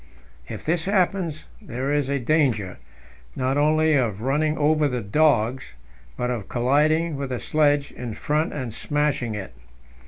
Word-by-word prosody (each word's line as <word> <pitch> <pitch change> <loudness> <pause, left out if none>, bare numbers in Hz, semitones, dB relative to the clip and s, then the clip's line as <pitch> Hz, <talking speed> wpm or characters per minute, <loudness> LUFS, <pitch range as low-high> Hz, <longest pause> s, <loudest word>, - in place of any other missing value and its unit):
If - - -7
this 165 +1 0
happens, 185 -5 0 0.2
there 130 +3 -3
is 145 -2 0
a 140 - +1
danger, 125 - 0 0.6
not 130 +1 0
only 155 +2 +3
of 115 -7 0
running 150 +4 +1
over 150 0 +3
the 125 -3 -2
dogs, 125 - +1 0.4
but 125 0 -1
of 110 -6 -4
colliding 150 +6 +2
with 140 -1 -4
the 125 -2 -3
sledge 145 -2 +1
in 120 -3 -6
front 150 +2 0
and 130 -6 -5
smashing 145 -4 -1
it. 95 -9 -7
145 Hz, 150 wpm, -24 LUFS, 125-155 Hz, 0.6 s, only